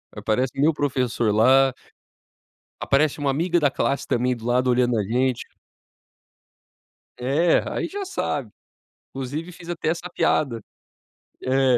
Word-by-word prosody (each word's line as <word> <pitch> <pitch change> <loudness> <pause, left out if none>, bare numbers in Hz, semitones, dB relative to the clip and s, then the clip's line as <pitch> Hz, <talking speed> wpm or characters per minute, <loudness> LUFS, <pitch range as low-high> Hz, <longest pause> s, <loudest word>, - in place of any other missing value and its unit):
Aparece 110 +5 0
meu 155 +3 +4
professor 125 -6 0
lá 130 +4 +5 1.1
aparece 145 +2 +1
uma 140 -1 +1
amiga 170 +4 +1
da 145 -3 +2
classe 140 +1 -1
também, 125 +1 +1
do 115 -1 -11
lado, 125 +1 +2
olhando 125 -1 +2
a 105 - +1
gente. 125 +4 0 1.7
É, 145 +7 +2
aí - - -2
já 400 0 -5
sabe. 145 - -3 0.6
Inclusive 145 +6 -5
fiz 170 -1 -13
até 170 -2 -2
essa 170 +2 -3
piada. 130 -8 0 0.8
É. 130 -1 +3
135 Hz, 125 wpm, -23 LUFS, 125-155 Hz, 1.7 s, lá